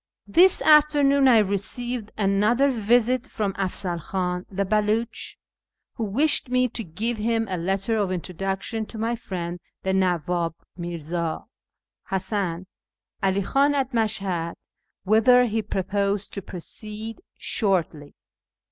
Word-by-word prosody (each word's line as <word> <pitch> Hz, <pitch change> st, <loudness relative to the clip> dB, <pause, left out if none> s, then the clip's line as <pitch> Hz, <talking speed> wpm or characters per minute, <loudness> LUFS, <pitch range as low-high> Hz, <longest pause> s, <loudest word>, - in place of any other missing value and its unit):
— -, -, -48 dB
This 375 Hz, 0 st, +5 dB
afternoon 290 Hz, -2 st, +5 dB
I 245 Hz, -3 st, +7 dB
received 215 Hz, +3 st, -1 dB
another 215 Hz, +7 st, +3 dB
visit 245 Hz, +2 st, +2 dB
from 205 Hz, -3 st, -2 dB
Afzal 185 Hz, -2 st, -2 dB
Khan 180 Hz, +1 st, -3 dB
the 200 Hz, 0 st, -1 dB
Beluch, 215 Hz, +3 st, -1 dB, 0.6 s
who 230 Hz, -, -3 dB
wished 275 Hz, +6 st, +2 dB
me 255 Hz, 0 st, +3 dB
to 230 Hz, -, -2 dB
give 215 Hz, +7 st, -3 dB
him 225 Hz, +1 st, +1 dB
a 185 Hz, -, -2 dB
letter 195 Hz, +5 st, -1 dB
of 200 Hz, -3 st, 0 dB
introduction 195 Hz, +5 st, -3 dB
to 225 Hz, -, -9 dB
my 225 Hz, +2 st, -1 dB
friend 175 Hz, -6 st, -5 dB, 0.2 s
the 190 Hz, -, 0 dB
Nawwab 175 Hz, -3 st, 0 dB, 0.2 s
Mirza 170 Hz, -1 st, -4 dB, 0.7 s
Hasan 190 Hz, -2 st, -2 dB, 0.6 s
'Ali 195 Hz, 0 st, +1 dB
Khan 280 Hz, +7 st, +2 dB
at 270 Hz, -2 st, 0 dB
Mashhad, 195 Hz, -7 st, -1 dB, 0.5 s
whither 225 Hz, +5 st, +5 dB
he 225 Hz, -1 st, -1 dB
proposed 200 Hz, 0 st, -1 dB
to 200 Hz, -, -4 dB
proceed 215 Hz, +5 st, -7 dB, 0.2 s
shortly. 165 Hz, -8 st, -1 dB
205 Hz, 125 wpm, -24 LUFS, 185-230 Hz, 0.7 s, I